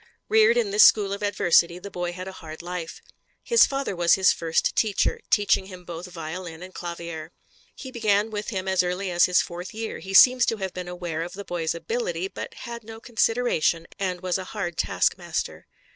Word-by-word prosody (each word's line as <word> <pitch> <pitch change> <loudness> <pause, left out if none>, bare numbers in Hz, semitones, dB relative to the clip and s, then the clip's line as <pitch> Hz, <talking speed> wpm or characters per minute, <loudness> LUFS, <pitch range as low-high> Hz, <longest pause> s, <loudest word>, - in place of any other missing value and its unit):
Reared 445 +2 +5
in 445 -4 +1
this 420 +2 +4
school 205 - +6
of 200 - -5
adversity 175 -4 +3
the 200 +2 -9
boy 175 -1 -3
had 185 +1 -7
a - - -5
hard 160 -3 -10
life. 175 -2 -6 0.4
His 470 -1 +5
father 275 -7 -3
was 170 -1 +4
his 190 -1 +4
first 165 -1 0
teacher, 215 -3 +1
teaching 195 -2 +2
him 185 -2 -11
both 170 +1 -7
violin 170 0 -7
and 185 0 -11
clavier. 170 -2 -7 0.4
He 260 - -9
began 215 -2 +1
with 210 0 -4
him 190 -3 -4
as 190 -1 +3
early 180 +1 -2
as 175 0 +5
his 180 -1 +3
fourth 175 +3 -8
year; 225 0 -5
he 195 0 -5
seems 250 +3 +7
to 225 - 0
have 190 -2 -4
been 180 -1 -6
aware 175 -2 -4
of 170 +1 -5
the 200 +1 -8
boy's 165 -2 -2
ability, 465 - -3
but - - -7
had 235 -1 -7
no 225 +1 -10
consideration, 225 -8 +1
and 185 -2 -2
was 185 0 -1
a - - -4
hard 175 -5 -3
taskmaster. - - -1
185 Hz, 200 wpm, -25 LUFS, 175-220 Hz, 0.4 s, seems